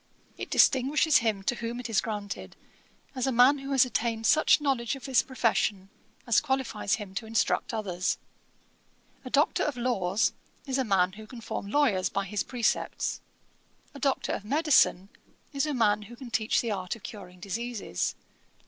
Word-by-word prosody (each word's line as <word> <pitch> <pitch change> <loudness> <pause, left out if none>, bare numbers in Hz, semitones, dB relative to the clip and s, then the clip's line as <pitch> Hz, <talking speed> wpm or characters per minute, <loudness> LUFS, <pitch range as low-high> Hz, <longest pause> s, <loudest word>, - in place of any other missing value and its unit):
It - - -7
distinguishes 280 +4 +4
him 215 -4 0
to 215 - +1
whom 235 +1 -4
it 245 - -5
is 225 -3 +1
granted, 205 -3 -6 0.6
as 255 -1 -2
a - - +2
man 255 +4 +5
who 275 0 -7
has 265 -2 +5
attained 230 -2 -2
such 310 +6 +5
knowledge 270 -4 0
of 270 - -10
his 260 -3 +3
profession 215 -6 -1 0.3
as 235 -3 +3
qualifies 265 - -1
him 200 -3 -8
to 220 +3 -5
instruct 225 0 0
others. 190 -5 -2 1.1
A 255 - -7
Doctor 285 +4 +2
of 290 -4 -1
Laws 225 -4 +1 0.3
is 270 -1 -1
a - - +2
man 190 -5 +2
who 215 +2 -12
can 245 - -10
form 200 -3 -5
lawyers 215 -8 +2
by 195 - -2
his 205 +1 -2
precepts. 240 -3 -1 0.7
A 280 - -10
Doctor 275 0 0
of - - -3
Medicine 270 - +3 0.4
is 275 +1 0
a 300 - -1
man 210 -3 +2
who 220 +3 -11
can 240 -1 -10
teach 220 -1 +1
the 235 - -3
art 185 -1 -3
of 230 - -16
curing 180 -5 -10
diseases. 210 - -3
230 Hz, 175 wpm, -28 LUFS, 205-265 Hz, 1.1 s, man